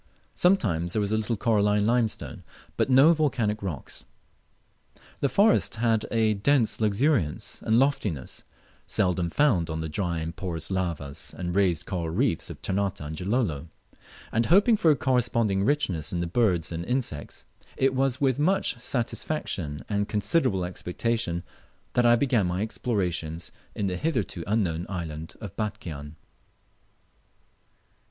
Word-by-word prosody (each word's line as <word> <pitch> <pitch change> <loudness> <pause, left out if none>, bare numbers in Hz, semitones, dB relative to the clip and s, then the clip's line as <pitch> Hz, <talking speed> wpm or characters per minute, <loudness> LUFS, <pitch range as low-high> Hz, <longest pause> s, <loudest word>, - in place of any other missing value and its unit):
Sometimes 95 - +2
there - - +1
was 100 0 -1
a - - +2
little 110 +1 -1
coralline 105 -2 +2
limestone, 115 -1 0 0.3
but - - +1
no 135 +6 +7
volcanic 125 -9 0
rocks. 85 -8 -5 1.1
The 140 - +1
forest 205 - +3
had 115 -1 +1
a 110 -2 +2
dense 115 +2 +2
luxuriance 105 - 0
and 110 - +2
loftiness 110 - 0 0.5
seldom 90 -3 +1
found 95 - +2
on 80 0 -3
the 80 - -3
dry 85 +2 -2
and 80 +1 -4
porous 85 -2 -3
lavas 85 -7 -4
and 90 -1 -3
raised 90 -5 +2
coral 85 -3 -3
reefs 100 - 0
of - - -10
Ternate 100 0 -1
and 75 +1 -6
Gilolo; 90 - -1 0.6
and 115 +1 +1
hoping 205 +6 +5
for 170 -6 +3
a 150 - +6
corresponding 115 -6 +1
richness 100 - 0
in 90 - -2
the 85 - -1
birds 90 -3 +1
and 85 0 -3
insects, 120 - -3 0.3
it 135 0 +2
was 130 0 +1
with 135 -2 +2
much 180 -6 +1
satisfaction 115 - -2
and 100 - -1
with 100 - 0
considerable 105 - +1
expectation 90 0 -2 0.5
that 120 -1 +4
I 120 - +7
began 120 -6 +2
my 90 +3 -1
explorations 90 -8 -2 0.2
in 105 - -1
the 90 -2 -1
hitherto 110 - -2
unknown 90 -6 0
island 80 -4 -5
of 105 -5 -8
Batchian. 85 -9 -5
105 Hz, 145 wpm, -26 LUFS, 85-125 Hz, 1.1 s, no